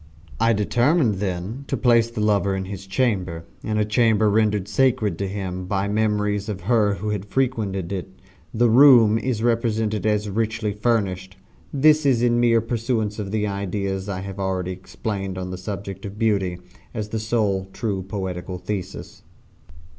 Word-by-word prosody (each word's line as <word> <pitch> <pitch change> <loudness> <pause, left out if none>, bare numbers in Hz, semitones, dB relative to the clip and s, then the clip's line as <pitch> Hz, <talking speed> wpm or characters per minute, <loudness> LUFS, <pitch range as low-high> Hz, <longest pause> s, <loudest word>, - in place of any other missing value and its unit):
I 115 - +4
determined, 120 - +2
then, 95 +6 -3
to - - -1
place 115 -2 +4
the 115 -2 -4
lover 100 -2 +2
in 95 0 -3
his 95 0 -8
chamber 95 -7 -1 0.2
in 110 -1 -1
a 105 - +2
chamber 110 -1 +3
rendered 105 -2 +1
sacred 115 -4 +2
to 100 - -1
him 95 -2 -4
by 100 +1 0
memories 105 -1 0
of 100 -3 -4
her 105 0 +2
who 105 +3 -4
had 105 -2 -2
frequented 105 -7 -1
it. 90 -5 -4 0.4
The 120 +2 +3
room 115 -3 +7
is 115 -2 -2
represented 110 -2 0
as 105 0 +1
richly 110 0 -1
furnished 100 -4 -1 0.3
this 155 +2 +4
in 120 -3 +3
mere 115 -1 +4
pursuance 115 -2 -2
of 100 -2 -4
the 105 0 -1
ideas 100 -1 -3
I 95 -2 -3
have 100 0 -7
already 95 -1 -1
explained 95 +1 -5
on 90 0 -4
the 90 - -5
subject 100 0 -6
of 100 -1 -7
Beauty, 100 -5 +1 0.4
as 105 -2 -3
the 110 - -2
sole 105 -4 0
true 100 -3 -2
poetical 95 -2 -5
thesis. 95 +1 -6
105 Hz, 160 wpm, -23 LUFS, 95-115 Hz, 0.4 s, room